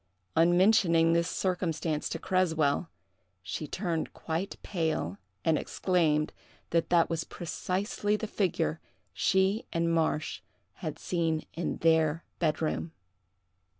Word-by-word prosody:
On 175 +2 +5
mentioning 170 -5 +5
this 170 0 +2
circumstance 165 -4 -1
to - - -3
Creswell, 160 -3 +1 0.5
she 95 - -4
turned 170 -3 -2
quite 170 +5 -3
pale 160 - -1 0.3
and 160 -2 +3
exclaimed 160 -5 +1 0.4
that 165 0 +1
that 170 -1 +4
was 165 -1 -2
precisely 190 +5 -2
the 215 - -3
figure 185 -6 0 0.3
she 190 +3 +2
and 165 0 +1
Marsh 160 -1 0 0.4
had - - -4
seen 165 -3 -1
in 170 - -2
their 160 -1 +3 0.2
bed 160 -1 +1
room. 160 +1 -2
165 Hz, 115 wpm, -30 LUFS, 160-185 Hz, 0.5 s, On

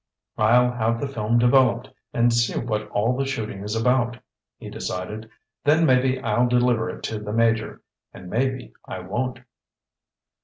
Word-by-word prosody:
"I'll 120 +3 +4
have 115 -1 -1
the 140 - -2
film 115 -3 0
developed 120 0 +3 0.2
and 120 0 +2
see 120 0 +1
what 105 -3 -3
all 115 +5 +1
the 135 - -1
shooting 110 -7 -4
is 105 +2 -3
about," 120 0 +1 0.4
he - - -10
decided. 105 +5 -5 0.3
"Then 155 +3 +4
maybe 130 -1 +3
I'll 120 0 +1
deliver 120 -2 +2
it - - -8
to 110 - -3
the 105 0 -6
Major, 115 0 0 0.3
and 90 - -12
maybe 130 +6 -2
I - - -7
won't." 120 +7 -3
120 Hz, 155 wpm, -23 LUFS, 110-125 Hz, 0.4 s, I'll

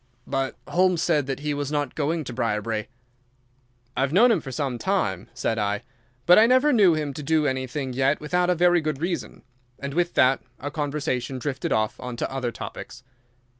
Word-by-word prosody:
"But 135 0 -2
Holmes 180 -1 +2
said 150 -6 +1
that 135 0 -3
he 150 0 -1
was 145 0 -3
not 145 -3 -1
going 160 +2 -1
to 125 - -7
Briarbrae." 110 -2 -1 1.1
"I - - 0
have 135 0 +1
known 230 +9 +6
him 225 - +2
for 135 - -7
some 130 -2 -2
time," 110 - -1
said 110 - -1
I, 105 0 -1 0.4
"but 175 +3 +8
I 225 - +6
never 260 +4 +4
knew 195 -8 +5
him 150 -2 -2
do 150 +2 0
anything 130 0 -2
yet 135 +3 +2
without 180 +4 0
a 180 - +3
very 175 0 +4
good 155 -3 -2
reason," 170 -3 -4 0.3
and 140 0 -5
with 175 +2 0
that 130 +1 +4 0.2
our 145 - -5
conversation 145 -3 -2
drifted 130 0 -3
off 110 0 0
on 125 -1 -6
to - - -3
other 130 -3 -2
topics. 130 - -8
145 Hz, 190 wpm, -25 LUFS, 130-170 Hz, 1.1 s, but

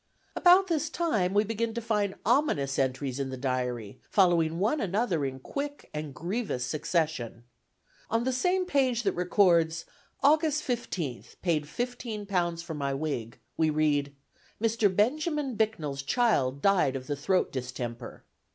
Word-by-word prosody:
About 365 +2 +6
this 320 -4 -1
time, 265 - 0
we 205 - +5
begin 225 +1 -2
to - - -1
find 210 -4 0
ominous 215 - +2
entries 130 0 -1
in 135 -1 -2
the 130 - -5
diary, 125 -5 -3
following 170 -4 +3
one 220 - +1
another 195 -4 0
in 135 -1 -3
quick 285 - -6
and 150 -1 -4
grievous 175 - -2
succession. 150 -4 -1 0.7
On 225 +1 +1
the 260 +1 0
same 365 +8 +1
page 260 -7 +1
that 195 - +2
records 175 -3 +2 0.4
(August 305 +1 +3
15th) 185 - -4
"P'd 160 -5 +1
£15 200 - -2
for 170 -1 -6
my 140 -2 -2
wig," 135 -6 -3 0.2
we 160 -1 +3
read, 145 -2 +1 0.4
"Mr. 225 -1 +2
Benjamin 275 - 0
Bicknells 160 -11 -1
Child 140 - +1
Died 190 -9 +3
of 130 -1 -5
the 145 - -2
throat 180 +6 +1
Distemper." 125 -2 -6
180 Hz, 140 wpm, -28 LUFS, 140-235 Hz, 0.7 s, About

